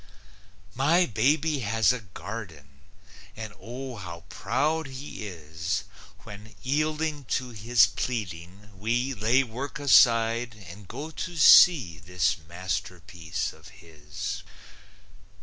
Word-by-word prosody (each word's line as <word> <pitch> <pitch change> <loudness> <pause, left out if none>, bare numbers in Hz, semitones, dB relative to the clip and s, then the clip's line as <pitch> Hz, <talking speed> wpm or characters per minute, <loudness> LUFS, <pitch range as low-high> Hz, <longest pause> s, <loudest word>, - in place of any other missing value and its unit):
My 160 +8 +3
baby 145 +6 +1
has 110 -1 +2
a 125 - -4
garden, 90 -8 -9 0.5
And 110 -1 -7
Oh, 125 +1 -7
how 85 -4 -8
proud 155 +4 -1
he 130 -5 -7
is 85 +3 -4 0.4
When, 105 +1 -12
yielding 150 +1 -1
to 125 +2 -2
his 115 0 +4
pleading, 100 -2 -5
we 120 +7 -1
Lay 120 +4 +2
work 130 +5 -6
aside 115 -4 +4
and 95 +3 -11
go 155 - -7
to 175 +2 -6
see 140 - +7
This 90 +5 0
masterpiece 90 -2 -4
of - - -16
his! 85 +6 -7
110 Hz, 110 wpm, -27 LUFS, 90-130 Hz, 0.5 s, see